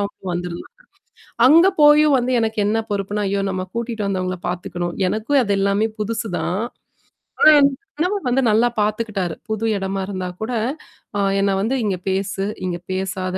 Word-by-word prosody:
அவுங்க 200 -1 -5
வந்திருந்தாங்க. 175 0 -5 0.8
அங்க 330 +6 +7
போயும் 295 0 +6
வந்து 250 0 -1
எனக்கு 220 -1 -1
என்ன 220 +2 +1
பொறுப்புன்னா, 205 +1 -2
"ஐயோ! 200 0 0
நம்ம 185 -1 -3
கூட்டிட்டு 230 -2 -3
வந்தவங்கள 185 -1 -2
பாத்துக்கணும்". 175 -1 -4
எனக்கும் 225 +8 +1
அது 200 -3 0
எல்லாமே 200 +2 +2
புதுசு 220 +1 -2
தான். 185 +4 -1 0.8
ஆனா 385 - +8
என் 280 0 +5 0.3
கணவர் 365 +5 -1
வந்து 255 +2 +2
நல்லா 220 +3 +4
பாத்துக்கிட்டாரு. 210 -4 -1 0.2
புது 220 +1 -2
இடமா 195 0 -3
இருந்தா 185 -2 -4
கூட 220 +3 -3 0.7
அ - - +1 0.2
என்ன 200 0 +2
வந்து, 230 +6 0
"இங்க 195 -3 0
பேசு. 195 0 -1 0.2
இங்க 180 -1 -2 0.2
பேசாத." 185 0 -3
205 Hz, 155 wpm, -20 LUFS, 190-230 Hz, 0.8 s, ஆனா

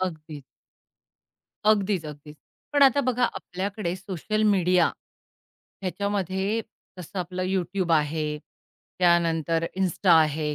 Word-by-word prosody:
अगदीच. 155 -5 -5 1.2
अगदीच-अगदीच. 160 -8 0 0.4
पण 285 -1 +4
आता 275 0 +6
बघा 250 -2 +1
आपल्याकडे 190 -2 -3
सोशल 195 +3 -3
मीडिया, 180 -3 +3 0.9
ह्याच्यामध्ये 195 +2 -1 0.4
जसं 180 +2 -7
आपलं 180 +1 -3
YouTube 185 -1 -1
आहे, 150 -1 0 0.6
त्यानंतर 165 -2 +2
इन्स्टा 185 -1 +2
आहे 155 -1 0
180 Hz, 90 wpm, -25 LUFS, 160-200 Hz, 1.2 s, आता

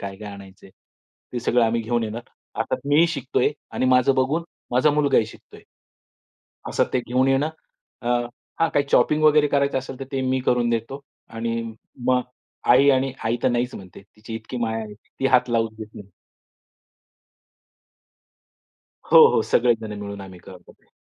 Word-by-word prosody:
काय-काय 100 +1 -7
आणायचे. 95 -1 -13 0.6
ते 120 - -3
सगळं 120 0 +2
आम्ही 115 +1 0
घेऊन 120 +1 -1
येणार. 110 +2 -5 0.3
अर्थात - - -3
मीही 155 +4 +5
शिकतोय 140 -5 0 0.2
आणि 130 - 0
माझं 125 +2 +4
बघून 145 +6 0 0.3
माझा 130 +5 +4
मुलगाही 145 -6 +2
शिकतोय. - - -15 1.1
असं - - +1
ते 130 - +1
घेऊन 130 +2 +1
येणं. 135 +3 +2 0.5
अ, 120 - -3 0.5
हां. 165 - +4
काही 145 - +1
चॉपिंग 155 0 +3
वगैरे 150 -1 +5
करायचं 140 -1 +1
असेल, 130 0 -8
तर 135 - -4
ते 135 - -1
मी 130 0 +1
करून 120 -1 +2
देतो. 115 +4 -3 0.3
आणि 115 0 -3 0.5
मग 125 -1 +3 0.5
आई 135 +3 +5
आणि 135 0 +1
आई 115 +2 +1
तर - - +3
नाहीच 120 0 -1
म्हणते. 95 -2 -11
तिची 105 +2 -11
इतकी 110 +3 -7
माया 115 -1 -1
आहे, 105 - -10
ती 120 +5 -5
हात 125 -1 +3
लावूच 115 -1 0
देत 110 -1 -9
नाही. 100 -1 -12 3.0
हो, - - +9
हो. - - +3
सगळे 120 -1 +3
जण 105 -1 -6
मिळून 100 -1 -7
आम्ही 95 -2 -11
करतो 90 0 -14
ते. - - -31
120 Hz, 160 wpm, -23 LUFS, 110-135 Hz, 3.0 s, हो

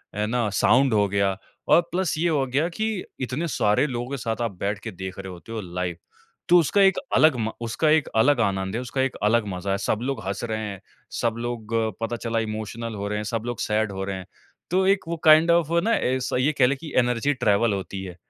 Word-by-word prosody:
है 105 - 0
ना 115 -2 0
साउंड 125 +6 +3
हो 105 -1 +3
गया 100 -1 0 0.3
और 170 - +6
प्लस 180 -2 0
ये 170 +2 +1
हो 145 -4 +1
गया 140 +6 +1
कि 215 +2 -2 0.2
इतने 130 +7 -2
सारे 105 -4 +2
लोगों 120 -1 -4
के 140 - -2
साथ 115 -2 -3
आप 115 -2 -1
बैठ 100 +1 -2
के 110 - -6
देख 95 -1 -7
रहे 95 -1 -6
होते 90 +5 -11
हो 115 -1 -3
लाइव। 90 -2 -4 0.5
तो 180 - +7
उसका 185 +6 +2
एक 195 -1 +5 0.2
अलग 155 -3 +5
म 110 0 -1
उसका 120 +7 0
एक 155 -2 +3
अलग 130 +4 +4
आनंद 95 -1 -1
है, 120 - -1
उसका 125 +1 -2
एक 135 -1 -1
अलग 110 +1 +3
मज़ा 95 0 -3
है 100 - +1
सब 105 - 0
लोग 130 -2 -2
हँस 100 +3 -3
रहे 110 -2 -2
हैं, 100 -2 -7 0.3
सब 115 -1 -1
लोग 115 -2 -5 0.3
पता 115 +1 -2
चला 115 0 -2
इमोशनल 110 +1 -4
हो 100 0 -4
रहे 105 +1 -2
हैं, 105 - -3
सब 115 +1 -2
लोग 120 -1 -4
सैड 110 0 0
हो 95 0 -4
रहे 95 0 -3
हैं। 95 - -8 0.5
तो 190 +1 +3
एक 195 0 +4
वो 170 0 -3
काइंड 160 +2 +7
ऑफ़ 170 -2 +2
ना 230 - +1
ऐसा 130 0 -1
ये 135 +4 +2
कह 125 - +7
ले 140 - +1
कि 150 +2 -9
एनर्जी 125 +3 +1
ट्रैवल 105 -2 +2
होती 95 0 -5
है। 90 -2 -8
115 Hz, 240 wpm, -24 LUFS, 100-140 Hz, 0.5 s, तो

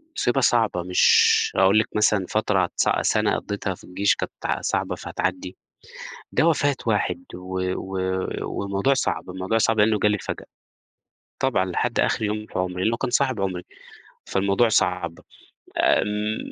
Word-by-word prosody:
مصيبة 130 +2 +1
صعبة 110 -8 +2
مش 90 +1 +4
هاقول 95 +3 +5
لِك 110 - 0
مثلًا 105 -2 +2
فترة 100 -4 +1
س - - +2
سنة - - +1
قضّيتها 100 -2 -4
في - - -19
الجيش 100 +3 +1
كانت - - -4
صعبة - - -1
فهتعَدّي، 95 0 -4 0.8
ده 160 - +2
وفاة 145 -3 +2
واحد 90 -5 0
و 95 +1 -5 0.2
و 95 -1 -2 0.2
والموضوع 100 +7 0
صعب، 130 -7 -2
الموضوع 95 +4 -2
صعب 115 0 +2
لأنه 105 0 +3
جالي 105 0 +2
فجأة. - - -6 0.9
طبعًا، 95 - +1
لحد 105 +6 -1
آخر - - +1
يوم 105 0 -2
في - - -5
عمري، 90 0 -2
لأنه 115 +3 +1
كنت 125 -1 -3
صاحب 130 -5 +1
عمري، 90 -2 -2 0.6
فالموضوع 100 +4 +1
صعب. - - 0 0.6
آمم، 105 +1 +1
100 Hz, 145 wpm, -23 LUFS, 95-110 Hz, 0.9 s, هاقول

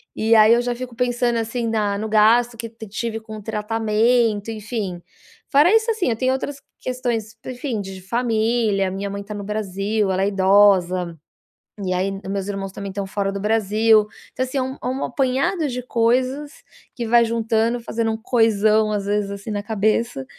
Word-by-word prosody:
E 220 +1 +2
aí 220 0 +7
eu 240 - +3
já 245 0 -1
fico 245 0 -7
pensando 245 0 0
assim 230 +1 -2
na 210 -3 0
no 215 +2 -3
gasto 230 +3 +4
que 230 0 -5 0.2
eu 220 - -9
tive 225 +2 -3
com 220 0 -10
o - - -9
tratamento, 220 0 +1
enfim. 210 -5 -4 0.5
Fora 300 +7 +5
isso, 450 +1 +3
assim, 425 - 0
eu 225 - +1
tenho 255 +3 +1
outras 275 +1 -4 0.2
questões, 240 -3 -3
enfim, 250 -3 -4
de 190 -1 -8
família, 225 -1 0
a - - -3
minha 200 +1 -4
mãe 200 0 -5
tá 210 +1 -8
no 205 -1 -6
Brasil, 205 0 -1
ela 190 +1 0
é 195 - +2
idosa, 190 -3 +3 0.6
e 185 -1 -1
aí 190 +2 0
os - - -5
meus 195 -1 -3
irmãos 195 -1 -4
também 200 0 -6
estão 195 0 -4
fora 195 0 -2
do 200 - -4
Brasil. 215 +1 +3 0.3
Então 255 - -1
assim 260 +2 -4
é - - +2
um 260 +1 -5
é - - -2
um 260 +2 -2
apanhado 275 +6 0
de 250 -2 -4
coisas 255 +5 0 0.4
que 235 -3 -4
vai 235 +1 +5
juntando, 230 +1 0
fazendo 230 -1 -2
um 220 - -3
coisão, 220 -2 +2
às 205 -2 -2
vezes 205 0 0
assim 200 +2 -6
na 205 -1 -2
cabeça 215 - 0
220 Hz, 195 wpm, -21 LUFS, 200-240 Hz, 0.6 s, aí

